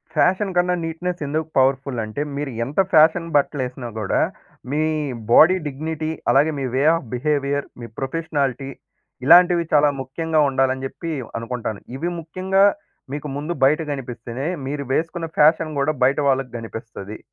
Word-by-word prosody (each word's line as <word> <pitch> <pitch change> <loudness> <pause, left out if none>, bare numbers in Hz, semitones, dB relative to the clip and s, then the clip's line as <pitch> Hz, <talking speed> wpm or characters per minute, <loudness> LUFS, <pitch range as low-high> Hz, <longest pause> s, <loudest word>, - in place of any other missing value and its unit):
Fashion 190 +1 +2
కన్నా, 180 0 +2
neatness 170 +2 -4
ఎందుకు 155 +2 -2
powerful 135 -1 +2
అంటే, 110 +7 -5 0.2
మీరు 145 -2 -3
ఎంత 145 +9 -3
ఫ్యాషన్ 160 +2 +5
బట్టలు 145 -1 0
వేసినా 125 -1 -7
కూడా, 100 - 0 0.5
మీ 150 +2 +1 0.5
బాడీ 175 +8 +7
డిగ్నిటీ, 155 +2 -4 0.2
అలాగే 145 +5 +4
మీ 135 - -2
way 135 - +2
of 165 -7 -5
behaviour, 140 +1 0 0.2
me 115 - -6
professionality 140 -2 -2 0.6
ఇలాంటివి 175 +2 +7
చాలా 150 0 +5
ముఖ్యంగా 155 +4 -1
ఉండాలని 130 0 0
చెప్పి 165 +4 -7 0.3
అనుకుంటాను. 115 -3 -4 0.2
ఇవి 165 +6 -2
ముఖ్యంగా 185 +4 +1 0.5
మీకు 150 +1 -4
ముందు 155 +4 -3
బయట 150 +4 +3
కనిపిస్తేనే, 125 +1 -6 0.2
మీరు 145 0 -3
వేసుకున్న 165 +2 -1
ఫ్యాషన్ 155 0 +4
కూడా 145 +3 +2
బయట 135 +3 +2
వాళ్ళకి 135 -2 +1
కనిపిస్తది. 110 -2 -8
145 Hz, 140 wpm, -21 LUFS, 130-165 Hz, 0.6 s, బాడీ